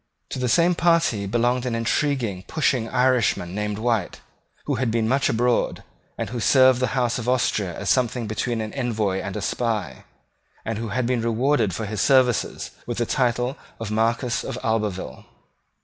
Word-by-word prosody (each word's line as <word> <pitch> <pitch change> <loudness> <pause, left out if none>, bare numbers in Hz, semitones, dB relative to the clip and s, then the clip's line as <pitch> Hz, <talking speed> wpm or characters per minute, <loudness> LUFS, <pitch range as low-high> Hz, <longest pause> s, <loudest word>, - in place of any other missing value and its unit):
To - - -3
the 125 -1 0
same 170 +6 +4
party 165 - +2
belonged 120 +3 +1
an 120 - -1
intriguing 115 -4 -1
pushing 130 -7 0
Irishman 125 -8 +1
named 105 0 -2
White, 110 -4 -1 0.5
who 145 - -1
had 125 - +1
been 110 0 0
much 135 +4 +2
abroad, 120 +1 +1 0.3
who - - -2
had 120 -1 -5
served 130 +1 +5
the 130 +1 -1
House 120 -1 +1
of 120 +1 -3
Austria 105 -8 0
as - - 0
something 125 -2 +1
between 110 +2 -2
an 110 0 -5
envoy 110 -7 -1
and 95 +1 -5
a 105 - -4
spy, 110 -7 -2 0.6
and 110 -1 -3
who 115 - -3
had 125 +4 -1
been 125 -1 0
rewarded 115 - +1
for 110 - -3
his 105 0 -3
services 130 -3 +2 0.2
with 120 - -3
the 120 - +1
title 125 +1 0 0.2
of 110 -2 -5
Marquess 115 +3 0
of - - -5
Albeville. 105 - -2
115 Hz, 175 wpm, -23 LUFS, 110-125 Hz, 0.6 s, served